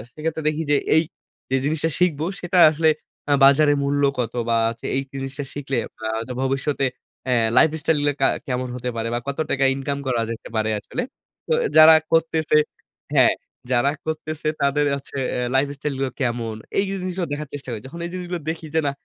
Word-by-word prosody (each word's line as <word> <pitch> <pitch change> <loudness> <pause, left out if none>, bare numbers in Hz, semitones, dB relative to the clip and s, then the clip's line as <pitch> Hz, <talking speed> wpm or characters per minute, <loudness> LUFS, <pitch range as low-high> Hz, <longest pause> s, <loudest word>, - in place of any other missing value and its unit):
সেক্ষেত্রে 160 +1 -3
দেখি 155 +1 -2
যে, - - +5 0.2
এই, 160 - +5 0.5
যে, 130 - +1
জিনিসটা 160 +2 0
শিখবো 160 -4 +2
সেটা 180 +1 +1
আসলে 160 +1 +3 0.4
আ - - +6
বাজারের 145 +1 +5
মূল্য 145 +1 +1 0.2
কত 115 -2 -1 0.2
বা 115 - +3
হচ্ছে 115 0 -8
এই 135 - +1
জিনিসটা 135 +1 -4
শিখলে 135 -2 -3 0.3
আ - - -1 0.2
তো 125 - -5
ভবিষ্যতে 135 +1 0 0.4
অ্যা 125 -1 +2 0.2
লাইফস্টাইলগুলো 155 -2 +3
একটা 135 -1 +2
কা - - +3 0.2
কেমন 125 -1 -1
হতে 125 0 -3
পারে 115 0 -2
বা 120 - 0
কত 140 - -3
টাকা 135 - +1
ইনকাম 140 +1 -3
করা 120 -3 +1
যেতে 115 - -7
পারে 110 0 +1
আসলে। 245 - -4 0.5
তো - - +2 0.2
যারা 155 +1 +10 0.2
করতেছে, 160 -1 +2 0.6
হ্যাঁ, - - +6 0.4
যারা 130 +3 +3
করতেছে 155 -1 -4
তাদের 140 +1 +2
হচ্ছে 140 0 -8 0.2
এ - - -1 0.2
লাইফ 135 +2 +3
স্টাইলগুলো 135 -2 -2
কেমন। 120 -3 -1 0.2
এই 195 - +4
যে, 195 - -2
জিনিসগুলো 185 -1 -2
দেখার 150 0 -5
চেষ্টা 140 -2 -6
করি। 110 -3 -5
যখন 170 +6 -9
এই - - -4
জিনিসগুলো 180 -2 -4
দেখি 160 0 -4
যে, - - +5
না 140 - +1
145 Hz, 190 wpm, -22 LUFS, 130-160 Hz, 0.6 s, যারা